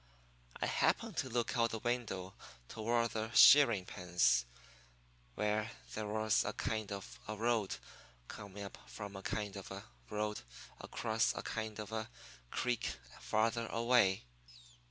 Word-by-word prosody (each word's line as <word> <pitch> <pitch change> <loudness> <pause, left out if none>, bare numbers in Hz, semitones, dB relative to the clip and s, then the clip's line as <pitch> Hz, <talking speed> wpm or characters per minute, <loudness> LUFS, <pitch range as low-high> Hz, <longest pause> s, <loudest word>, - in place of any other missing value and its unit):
I - - 0
happened - - +1
to 130 - 0
look 120 -1 0
out 115 -1 +3
the 115 - -3
window 110 -6 -2 0.3
toward 115 +1 0
the 110 0 -3
shearing 115 -10 +8
pens, 90 -11 +2 0.9
where 105 +1 0 0.2
there 110 -1 -3
was 110 +1 +2
a - - -2
kind 110 -3 -2
of 100 -1 -7
a 110 - -3
road 110 -2 +1 0.5
coming 100 0 -8
up 100 - -9
from 100 -2 -7
a 95 - -6
kind 105 0 -3
of 100 - -7
a 95 +1 -7 0.3
road 105 0 -2 0.4
across - - 0
a - - -4
kind 110 -1 -4
of 105 0 -6
a 110 0 -3 0.4
creek 125 - -1 0.2
farther 115 +1 +1
away. 115 -5 +3
110 Hz, 140 wpm, -35 LUFS, 100-115 Hz, 0.9 s, shearing